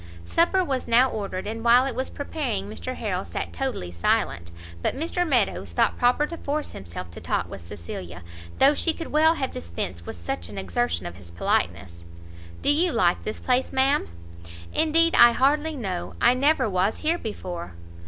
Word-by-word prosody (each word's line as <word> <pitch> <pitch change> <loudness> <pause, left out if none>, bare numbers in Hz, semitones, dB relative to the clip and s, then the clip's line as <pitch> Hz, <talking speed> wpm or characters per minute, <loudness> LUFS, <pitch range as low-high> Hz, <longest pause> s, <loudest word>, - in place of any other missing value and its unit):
Supper 360 - +3
was 265 -6 -2
now 245 +3 +5
ordered, 195 -3 -4
and 225 +2 -5
while 240 +2 +6
it 270 - -2
was 260 +3 -3
preparing 255 -9 -3
Mr 255 +4 -5
Harrel 190 -4 -2
sat - - -5
totally 255 - -3
silent; 85 0 0 0.3
but - - 0
Mr 340 +4 -1
Meadows 205 - +1
thought - - +2
proper 250 +4 +3
to 335 +2 -7
force 295 0 -3
himself 85 -1 -8
to - - -10
talk - - -1
with 95 - -9
Cecilia, 85 -2 -8 0.3
though 275 +2 +6
she 330 +2 0
could 330 - -7
well 315 +2 +5
have 265 -4 -2
dispensed 85 0 -5
with - - -5
such 85 0 -4
an 100 - -9
exertion 95 -1 -1
of 85 - -7
his 90 -3 -14
politeness. 85 0 -1 0.6
"Do - - +4
you 335 +4 +3
like 180 -7 +2
this 215 - -4
place, 255 0 +1
ma'am?" 265 - +2 0.7
"Indeed 330 +1 +3
I 240 0 +8
hardly 295 +5 +2
know, 90 - -4
I - - +5
never 280 +1 +2
was 190 +1 +1
here 335 +2 +2
before." 175 - -6
230 Hz, 180 wpm, -25 LUFS, -, 0.7 s, I